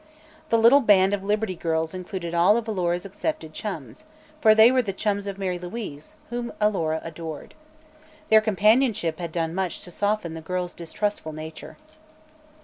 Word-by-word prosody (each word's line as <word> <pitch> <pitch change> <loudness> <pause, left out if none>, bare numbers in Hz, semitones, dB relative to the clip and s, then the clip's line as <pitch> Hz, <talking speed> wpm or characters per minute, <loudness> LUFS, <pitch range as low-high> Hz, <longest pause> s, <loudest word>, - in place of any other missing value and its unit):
The 230 - +4
little 230 +5 +7
band 200 -5 +4
of 200 -1 -2
Liberty 210 -1 -1
Girls 160 0 -1
included 180 -2 -5
all 175 +6 +5
of 235 -1 -3
Alora's 180 -3 -1
accepted 305 - -4
chums, - - -7 0.4
for 220 -4 +6
they 220 +2 +8
were 260 0 +3
the 200 -5 -4
chums 200 0 -1
of 195 -1 -5
Mary 185 -2 -2
Louise, 175 -5 -7 0.2
whom 240 0 -3
Alora 170 -7 +1
adored. 160 -2 -7 0.8
Their 220 0 +7
companionship 215 -4 +2
had 170 -2 -4
done 165 -1 -2
much 185 -2 -2
to 175 - -9
soften 205 -2 -1
the 160 - -7
girl's 180 +1 -3
distrustful 170 -1 -3
nature. 155 +1 -9
190 Hz, 160 wpm, -25 LUFS, 170-215 Hz, 0.8 s, they